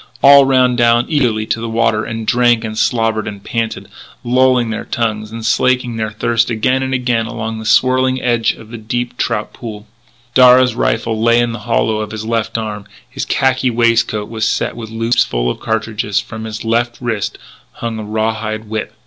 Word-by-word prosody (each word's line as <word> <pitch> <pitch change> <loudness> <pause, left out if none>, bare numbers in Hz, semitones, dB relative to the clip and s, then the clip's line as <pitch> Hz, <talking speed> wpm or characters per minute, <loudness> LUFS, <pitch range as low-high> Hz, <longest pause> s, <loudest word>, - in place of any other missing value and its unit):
All 140 0 +8
ran 130 -2 +3
down 120 0 +3
eagerly 120 -8 +1
to 115 - -2
the 115 - -4
water 110 -1 +1
and 115 -1 -5
drank 120 -1 +3
and 110 -1 -5
slobbered 115 -2 0
and 100 -1 -7
panted, 115 -1 -3 0.4
lolling 125 -1 +2
their 110 - -4
tongues, 110 -2 -2
and 115 0 -7
slaking 125 0 +1
their 110 -1 -2
thirst 115 +2 0
again 120 +3 +1
and 130 0 -2
again 125 -3 0
along 110 -1 -5
the 110 - -6
swirling 130 +1 +3
edge 120 -3 +1
of 115 +1 -14
a 115 - -6
deep 120 +3 -3
trout 110 -3 -2
pool. 110 -3 -8 0.5
Darragh's 125 0 +6
rifle 115 -1 -1
lay 115 +1 +4
in 120 -1 +1
the 115 - -6
hollow 110 -1 +1
of 105 -1 -4
his 110 0 -6
left 115 0 -1
arm; 105 -2 -5 0.2
his - - -5
khaki 130 -1 +1
waistcoat 115 -3 +1
was 110 -1 -2
set - - -1
with 115 -2 -7
loops 115 +2 +1
full - - -1
of - - -7
cartridges. 110 -2 -1
From 110 0 -7
his 110 0 -6
left 120 +1 0
wrist 115 -5 -3 0.4
hung 115 -1 -5
a - - -5
raw 110 +1 -1
hide 110 -1 -5
whip. 110 0 -4
115 Hz, 190 wpm, -16 LUFS, 110-120 Hz, 0.5 s, All